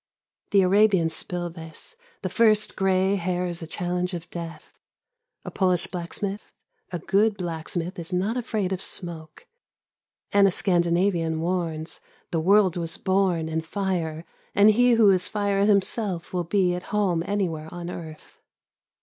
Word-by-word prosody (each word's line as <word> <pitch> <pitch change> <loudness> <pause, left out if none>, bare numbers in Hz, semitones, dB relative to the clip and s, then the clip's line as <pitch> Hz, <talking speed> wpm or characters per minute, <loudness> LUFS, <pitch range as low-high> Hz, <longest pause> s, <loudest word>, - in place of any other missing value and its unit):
The 200 -2 +4
Arabians 190 -4 +4
spill 175 +1 -3
this: 160 - -11 0.3
The - - -1
first 215 -2 +3
gray 190 +1 +2
hair 180 0 -1
is 175 -1 -4
a 165 - -6
challenge 180 +2 -2
of 170 0 -7
death. 170 -1 -8 0.7
A - - -5
Polish 180 -3 +1
blacksmith: 195 +3 -5 0.4
A 175 - -2
good 205 +5 +2
black 165 -3 -5
smith 175 +2 -3
is 170 +2 -5
not 190 +6 0
afraid 220 -6 -2
of 190 - -4
smoke. 165 -5 -6 0.9
And 200 0 +5
a - - +2
Scandinavian 170 -2 +1
warns: 165 -2 -2 0.3
The 165 - +1
world 190 +1 +4
was 165 -1 -3
born 185 -4 +1
in 160 0 -1
fire 165 -3 -3 0.3
and 205 +2 +7
he 245 +3 +4
who 220 -3 +6
is 185 -1 +1
fire 200 -1 +1
himself 200 -3 0
will 175 -1 -1
be 180 0 +2
at 180 0 -4
home 195 -5 +1
anywhere 170 -6 -2
on 175 0 -6
earth. 160 -3 -10
180 Hz, 150 wpm, -25 LUFS, 170-200 Hz, 0.9 s, and